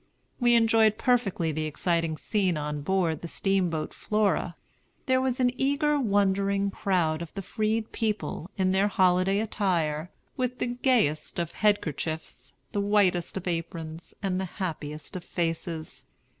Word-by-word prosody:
We 240 -2 +5
enjoyed 225 -2 +4
perfectly 220 -11 +1
the 155 +1 -2
exciting 165 +1 0
scene 190 -4 0
on 150 0 -3
board 170 -1 0
the 170 - -5
steamboat 180 -4 0
Flora. 205 -4 0 0.5
There 260 -1 +3
was 260 0 0
an 250 -1 +3
eager, 285 +2 +2
wondering 200 -3 +2
crowd 175 -6 0
of 170 - -6
the 195 - -4
freed 220 +2 -1
people, 210 -5 -2
in 185 -1 +2
their 195 +2 +3
holiday 185 -1 +3
attire, 175 -7 0 0.3
with 250 0 -1
the - - -1
gayest 240 - +1
of 170 -2 -2
headkerchiefs, 160 -6 -1 0.2
the 205 - 0
whitest 200 -4 +2
of 185 - -5
aprons, 165 -1 -4
and 190 -1 0
the - - -1
happiest 155 -4 -4
of 180 - -5
faces. 165 - -3
190 Hz, 145 wpm, -27 LUFS, 165-215 Hz, 0.5 s, We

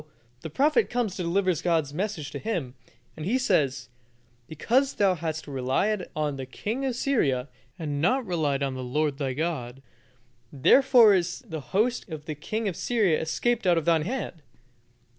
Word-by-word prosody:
the 160 - -6
prophet 300 - +2
comes 240 -6 -1
to - - -4
deliver 185 +2 +1
God's 160 -3 0
message 165 -5 -3
to - - -5
him, 175 - -3 0.4
and 155 - -7
he 215 +10 +1
says: 140 - +1 0.6
"Because 250 - +1
thou 195 -2 +3
hast 160 -2 -4
relied 145 +10 -1
on 150 -2 -1
the 130 -1 -6
king 220 - -4
of 260 -3 -1
Syria, 145 - 0 0.3
and 145 -3 -3
not 255 - +2
relied 150 -7 0
on 135 -1 -1
the 130 0 -5
Lord 145 +3 -1
thy 135 -3 -1
God, 135 -4 -3 0.7
therefore 235 - +6
is 175 -2 0
the 160 -8 -6
host 210 - -1
of 155 -2 -7
the 155 - -4
king 215 +9 -3
of 185 - -2
Syria 210 -10 +1
escaped 230 +7 0
out 175 -2 +4
of 165 - -1
thine 165 -2 +3
hand. 185 -3 -4
165 Hz, 170 wpm, -26 LUFS, 145-215 Hz, 0.7 s, therefore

